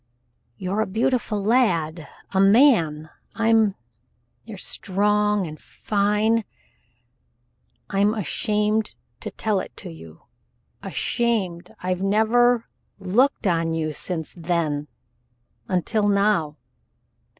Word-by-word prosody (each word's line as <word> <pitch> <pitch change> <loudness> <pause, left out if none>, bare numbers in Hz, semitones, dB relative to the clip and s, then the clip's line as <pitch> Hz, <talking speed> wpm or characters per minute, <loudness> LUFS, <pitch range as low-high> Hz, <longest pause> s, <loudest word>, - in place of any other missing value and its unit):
"You're 190 +3 -2
a - - -1
beautiful 220 0 0
lad 170 - +1 0.3
a 190 - +2
man 195 - +4 0.2
I'm 225 -3 +3 0.7
You're 220 -3 -9
strong 210 +1 +1
and 155 -1 -9
fine 210 +2 0 1.4
I'm 205 +2 +1
ashamed 210 +1 0 0.2
to - - -5
tell 215 -3 -1
it - - -9
you 80 0 -11 0.6
ashamed 205 -8 -2
I've 185 0 -2
never 225 +4 +3 0.3
looked 225 +8 +1
on 165 -3 +1
you 155 -1 -2
since 160 0 -4
then 160 -4 -1 0.8
until 205 +4 0
now. 200 -7 +1
200 Hz, 95 wpm, -23 LUFS, 170-220 Hz, 1.4 s, man